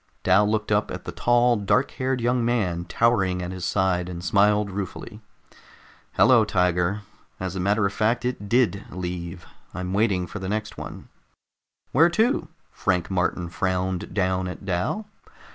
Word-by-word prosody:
Dal 105 Hz, +1 st, +4 dB
looked 105 Hz, 0 st, -1 dB
up 105 Hz, 0 st, +2 dB
at -, -, -7 dB
the -, -, -4 dB
tall, 120 Hz, 0 st, +3 dB
dark 105 Hz, +6 st, +1 dB
haired 130 Hz, -1 st, -2 dB
young 120 Hz, +1 st, +1 dB
man, 95 Hz, -8 st, 0 dB
towering 95 Hz, -3 st, +1 dB
at 90 Hz, -, -4 dB
his 90 Hz, -2 st, -5 dB
side, 90 Hz, -2 st, 0 dB
and 90 Hz, 0 st, -6 dB
smiled 105 Hz, 0 st, +3 dB
ruefully. 100 Hz, +3 st, -6 dB, 0.9 s
"Hello, 125 Hz, -4 st, +5 dB
Tiger! 90 Hz, 0 st, +1 dB, 0.4 s
As 95 Hz, 0 st, -4 dB
a -, -, -3 dB
matter 100 Hz, +3 st, +2 dB
of 100 Hz, -, -1 dB
fact, 115 Hz, +3 st, +1 dB
it 125 Hz, -5 st, -3 dB
did 110 Hz, -5 st, +2 dB
leave. 90 Hz, -1 st, -6 dB, 0.3 s
I'm 90 Hz, 0 st, -4 dB
waiting 100 Hz, -3 st, +1 dB
for 105 Hz, -, -7 dB
the 95 Hz, 0 st, -4 dB
next 105 Hz, 0 st, -3 dB
one." -, -, -9 dB, 0.8 s
"Where 165 Hz, +6 st, +5 dB
to?" 220 Hz, -2 st, +1 dB, 0.2 s
Frank 90 Hz, -1 st, -1 dB
Martin 90 Hz, -1 st, 0 dB
frowned 95 Hz, +1 st, -2 dB
down 95 Hz, -1 st, 0 dB
at 90 Hz, +2 st, -7 dB
Dal. 95 Hz, -, -1 dB
100 Hz, 160 wpm, -24 LUFS, 90-115 Hz, 0.9 s, Hello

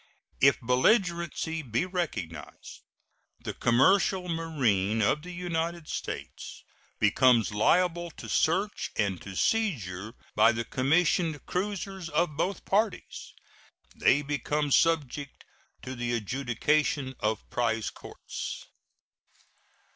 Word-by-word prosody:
If 140 Hz, +1 st, +5 dB
belligerency 165 Hz, -, +1 dB
be 120 Hz, +3 st, -1 dB
recognized, 115 Hz, -, -5 dB, 0.6 s
the -, -, -5 dB
commercial 180 Hz, +9 st, +3 dB
marine 125 Hz, -, 0 dB
of 110 Hz, +8 st, +2 dB
the 180 Hz, -, -10 dB
United 170 Hz, -2 st, -3 dB
States -, -, -6 dB, 0.3 s
becomes 120 Hz, +2 st, +4 dB
liable 175 Hz, +10 st, +2 dB
to -, -, -10 dB
search 195 Hz, +6 st, 0 dB
and 100 Hz, -4 st, -1 dB
to 95 Hz, -1 st, -9 dB
seizure 110 Hz, -, -1 dB, 0.2 s
by 115 Hz, -, +5 dB
the 115 Hz, +1 st, -3 dB
commissioned 155 Hz, +2 st, +1 dB
cruisers 195 Hz, -2 st, -3 dB
of 165 Hz, -3 st, 0 dB
both 185 Hz, +5 st, -2 dB
parties; 210 Hz, 0 st, -1 dB, 0.6 s
they 145 Hz, +2 st, +3 dB
become 145 Hz, +1 st, -1 dB
subject 145 Hz, -3 st, +1 dB, 0.4 s
to 130 Hz, -, -5 dB
the 120 Hz, -1 st, -2 dB
adjudication 130 Hz, +4 st, 0 dB
of 110 Hz, +1 st, -2 dB
prize 115 Hz, -2 st, 0 dB
courts. -, -, -7 dB
145 Hz, 100 wpm, -28 LUFS, 120-175 Hz, 0.6 s, If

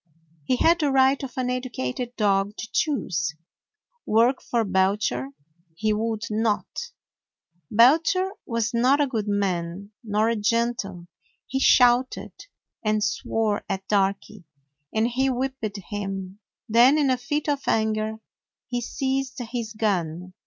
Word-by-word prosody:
He 255 Hz, -, +2 dB
had 330 Hz, +7 st, +4 dB
the 295 Hz, -3 st, +2 dB
right 265 Hz, +1 st, +4 dB
of 265 Hz, -3 st, -6 dB
an 250 Hz, -1 st, 0 dB
educated 245 Hz, -, -4 dB
dog 200 Hz, -1 st, +1 dB
to 220 Hz, -, -5 dB
choose. 175 Hz, -, 0 dB, 0.7 s
Work 235 Hz, +4 st, +3 dB
for 235 Hz, -2 st, 0 dB
Belcher 190 Hz, -, 0 dB, 0.5 s
he 215 Hz, +4 st, 0 dB
would 220 Hz, 0 st, -2 dB
not. 215 Hz, -1 st, +1 dB, 1.0 s
Belcher 325 Hz, -, +4 dB, 0.2 s
was 230 Hz, 0 st, -1 dB
not 255 Hz, +5 st, +3 dB
a 290 Hz, -, +4 dB
good 225 Hz, -6 st, -3 dB
man, 195 Hz, -1 st, -2 dB
nor 215 Hz, 0 st, +1 dB
a 230 Hz, -, +1 dB
gentle. 215 Hz, -4 st, -1 dB, 0.4 s
He 265 Hz, -, -2 dB
shouted 250 Hz, -1 st, +4 dB, 0.5 s
and 215 Hz, -1 st, +1 dB
swore 215 Hz, 0 st, -1 dB
at 195 Hz, -1 st, -3 dB
Darky 200 Hz, 0 st, 0 dB, 0.5 s
and 220 Hz, +1 st, +1 dB
he 260 Hz, +3 st, +1 dB
whipped 255 Hz, -5 st, -3 dB
him. 195 Hz, -1 st, -5 dB, 0.3 s
Then 245 Hz, +6 st, +6 dB
in 285 Hz, -3 st, +3 dB
a 255 Hz, -, +2 dB
fit 295 Hz, +5 st, -2 dB
of 285 Hz, -2 st, 0 dB
anger 220 Hz, 0 st, +1 dB, 0.5 s
he 245 Hz, -1 st, -2 dB
seized 265 Hz, +2 st, -2 dB
his 235 Hz, -2 st, -4 dB
gun. 180 Hz, -5 st, -2 dB
225 Hz, 130 wpm, -24 LUFS, 205-255 Hz, 1.0 s, Then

